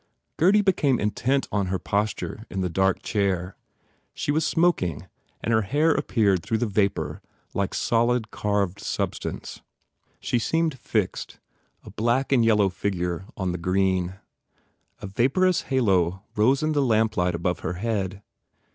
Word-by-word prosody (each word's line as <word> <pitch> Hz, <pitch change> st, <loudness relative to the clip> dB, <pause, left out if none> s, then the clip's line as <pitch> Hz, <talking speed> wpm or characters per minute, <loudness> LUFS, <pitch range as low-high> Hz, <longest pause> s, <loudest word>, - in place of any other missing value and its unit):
Gurdy 200 Hz, +5 st, +4 dB
became 150 Hz, -, +2 dB
intent 130 Hz, +6 st, 0 dB
on 100 Hz, -2 st, 0 dB
her 95 Hz, +1 st, 0 dB
posture 105 Hz, +3 st, -2 dB
in 95 Hz, -, -3 dB
the 90 Hz, -2 st, -1 dB
dark 95 Hz, +2 st, +1 dB
chair. 95 Hz, -3 st, -1 dB, 0.6 s
She -, -, -1 dB
was 155 Hz, +2 st, +1 dB
smoking 155 Hz, -, +1 dB, 0.4 s
and 115 Hz, -, +1 dB
her 110 Hz, -, +4 dB
hair 145 Hz, +10 st, +2 dB
appeared 100 Hz, -10 st, +1 dB
through 110 Hz, -, -1 dB
the 120 Hz, -, 0 dB
vapour 100 Hz, -2 st, -1 dB, 0.3 s
like 100 Hz, -1 st, -1 dB
solid, 120 Hz, -1 st, +1 dB
carved 100 Hz, -3 st, -1 dB
substance. -, -, -4 dB, 0.6 s
She 120 Hz, -, 0 dB
seemed 160 Hz, +2 st, 0 dB
fixed, 105 Hz, -5 st, -2 dB, 0.4 s
a -, -, -11 dB
black 120 Hz, +5 st, 0 dB
and 125 Hz, -4 st, +4 dB
yellow 105 Hz, -3 st, +4 dB
figure 90 Hz, -2 st, -2 dB
on 95 Hz, -2 st, -1 dB
the 90 Hz, -, -4 dB
green. 95 Hz, 0 st, +1 dB, 0.9 s
A -, -, -3 dB
vaporous 135 Hz, -, +2 dB
halo 95 Hz, -8 st, +2 dB
rose 130 Hz, +7 st, +3 dB
in 155 Hz, -, +1 dB
the 145 Hz, -2 st, +2 dB
lamplight 110 Hz, -7 st, +2 dB
above 90 Hz, +1 st, -1 dB
her -, -, -3 dB
head. 100 Hz, -1 st, -3 dB
105 Hz, 145 wpm, -25 LUFS, 95-130 Hz, 0.9 s, Gurdy